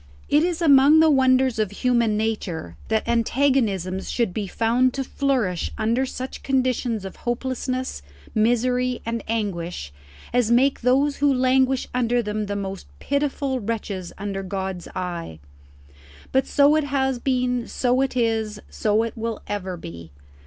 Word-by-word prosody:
It 295 - +4
is 350 -1 -1
among 285 0 +7
the 320 -1 +6
wonders 260 -3 +3
of 215 -3 +1
human 235 0 +1
nature 205 - -3
that 220 0 0
antagonisms 230 -6 +1
should 230 -7 0
be 205 -1 -3
found 240 +5 +1
to 270 - -1
flourish 250 -10 -1
under 235 +4 +1
such 255 +1 -6
conditions 255 -5 0
of 190 - -8
hopelessness, 255 - -3 0.3
misery, 250 +3 +1
and 230 0 -3
anguish 180 - -3 0.4
as 245 -2 +2
make 260 +4 +3
those 275 +4 +2
who 285 0 +3
languish 260 0 +2
under 245 -1 +1
them 210 0 -3
the 205 - -3
most 195 -1 -5
pitiful 280 -2 -1
wretches 205 -5 -4
under 195 -1 -4
God's 190 -1 -4
eye. 170 - -4 0.9
But 265 0 +2
so 285 +1 +4
it 310 -2 +1
has 265 -2 0
been, 250 -2 0
so 250 +1 +1
it 270 -1 -1
is, 220 -3 0
so 215 +1 +1
it 230 - -4
will 225 -1 -4
ever 190 -3 -4
be. 85 - -9
235 Hz, 145 wpm, -23 LUFS, 205-260 Hz, 0.9 s, among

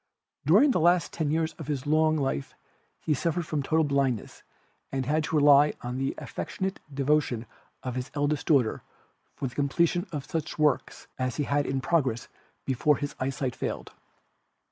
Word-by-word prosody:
During 290 -1 +6
the 210 - +1
last 175 0 +3
ten 155 -3 -1
years 160 +1 0
of 155 - -7
his 145 -2 -2
long 155 +1 +3
life 135 - -2 0.5
he 155 - +1
suffered 165 +3 -1
from 155 -2 -1
total 160 +4 +2
blindness 140 -6 -1 0.5
and 135 -1 -1
had 155 +4 +1
to 160 - -2
rely 145 0 +6
on 125 +1 -3
the 135 0 -1
affectionate 190 0 -4
devotion 140 -4 +1 0.4
of 125 - -3
his 125 0 -4
eldest 145 0 0
daughter 135 -8 +3 0.5
for 135 - -3
the 125 - -9
completion 170 +6 +1
of 145 -4 -4
such 155 0 -4
works 150 -3 +1
as 130 -2 -1
he 150 - 0
had 145 +1 0
in 135 0 -1
progress 130 -6 0 0.4
before 135 +3 +2
his 145 -1 -4
eyesight 130 -1 -2
failed. - - -4
145 Hz, 165 wpm, -27 LUFS, 135-155 Hz, 0.5 s, During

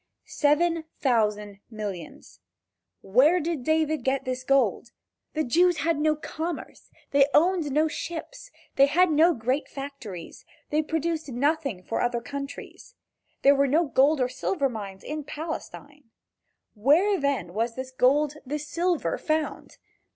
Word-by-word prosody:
Seven 320 +2 +1
thousand 210 -5 0
millions. 205 -7 -8 0.6
Where 270 - +4
did 325 -4 -3
David 315 -1 +1
get 265 +1 0
this 255 0 -3
gold? 245 -4 +1 0.4
The 310 - +1
Jews 350 +7 +3
had 330 -3 +1
no 310 0 +2
commerce. 320 +2 -6 0.2
They 280 0 +5
owned 335 -2 +3
no 305 +3 +3
ships. 345 +11 -6 0.3
They 275 - +7
had 350 +4 +3
no 325 +3 +4
great 255 +5 -1
factories, 270 -11 -8 0.3
they 305 +1 +2
produced 320 0 -2
nothing 275 - -1
for 225 - -2
other 240 0 0
countries. 280 - -8 0.5
There 280 - +7
were 280 0 +2
no 315 +6 +3
gold 280 +1 +3
or 250 - +2
silver 275 +3 -1
mines 200 -5 -7
in 305 0 -5
Palestine. 295 -1 -7 0.7
Where 320 - +3
then 280 - -1
was 230 +3 -1
this 260 0 -6
gold, 285 +4 +2
this 295 +3 -5
silver 345 0 -1
found? 310 0 -2
285 Hz, 135 wpm, -26 LUFS, 250-315 Hz, 0.7 s, They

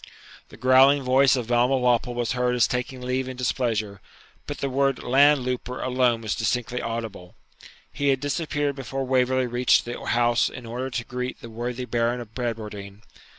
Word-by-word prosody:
The - - -14
growling 130 +3 +5
voice 130 +1 +4
of 125 -3 -2
Balmawhapple 125 0 +2
was 120 -1 -1
heard 125 -1 0
as 120 -1 +3
taking 125 +1 -4
leave 130 +1 -2
in 130 - -7
displeasure, 110 -5 -1 0.5
but - - -5
the 140 - -2
word 135 0 0
'land 140 +1 +4
louper' 125 0 -3
alone 125 -2 +1
was 110 -2 -2
distinctly 125 +2 -1
audible. 115 -6 -6 0.6
He 140 0 -1
had 135 -1 +3
disappeared 145 0 -2
before 135 0 -4
Waverley 130 0 +2
reached 120 +1 +2
the 120 0 -6
house 120 0 +2
in 125 - -10
order 125 +3 -4
to 120 -2 -4
greet 125 0 -5
the 115 - -10
worthy 120 +2 -4
Baron 120 +1 0
of 115 -2 -10
Bradwardine. 105 -4 -5
125 Hz, 170 wpm, -24 LUFS, 120-130 Hz, 0.6 s, growling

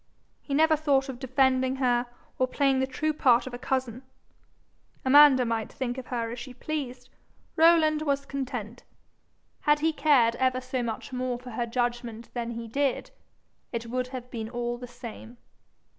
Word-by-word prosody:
He 280 - -3
never 315 +1 +5
thought 280 -3 +1
of 250 -2 -6
defending 260 0 +2
her 245 -2 +1 0.3
or 255 - +3
playing 270 0 +2
the 265 - +1
true 310 +4 -1
part 250 -5 +4
of 260 - -7
a 245 - -6
cousin. 255 -2 -2 1.0
Amanda 270 -1 +7
might 225 -1 -2
think 255 -1 -3
of 255 - -9
her 230 -2 -3
as 240 - -6
she 250 +1 -9
pleased: 275 -2 -5 0.5
Rowland 320 -2 +5
was 280 -2 0
content. 245 -5 -5 0.8
Had 295 0 +2
he 320 0 +2
cared 255 -7 +4
ever 255 0 +1
so 255 0 -3
much 235 +2 -5
more 250 -1 -2
for 250 0 -10
her 235 +1 -2
judgment 240 -1 -3
than 235 -1 -3
he 230 0 -6
did, 275 +3 -1 0.6
it 235 -1 -4
would 255 0 -1
have 250 -1 -8
been 225 -2 -5
all 240 0 -3
the 245 - -7
same. 240 -1 -10
255 Hz, 170 wpm, -27 LUFS, 240-275 Hz, 1.0 s, Amanda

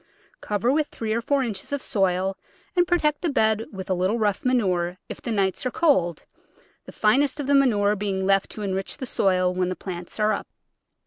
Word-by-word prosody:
Cover 210 +4 0
with 300 +1 +1
three 220 -1 -3
or 230 - 0
four 275 +3 +1
inches 215 -3 -5
of 285 - -1
soil 190 -4 0 0.4
and 355 -1 +3
pro 350 - +3
tect 300 -3 0
the 345 - 0
bed 220 -5 +1
with 190 -3 -7
a 190 - +1
little 185 +5 +1
rough 210 -3 0
manure 185 -8 +1
if - - -7
the 235 - -4
nights 195 -3 0
are 255 - 0
cold, 185 - +1 0.6
the - - -10
finest 270 +7 +2
of 290 - -2
the 285 - +2
manure 210 -7 +3
being 195 -2 -2
left 195 0 +2
to 215 - -6
enrich 195 -1 -3
the 270 - -5
soil 185 -6 +1
when 180 0 0
the 185 - -3
plants 175 +1 -7
are 215 0 +3
up. - - -4
210 Hz, 210 wpm, -24 LUFS, 190-260 Hz, 0.6 s, and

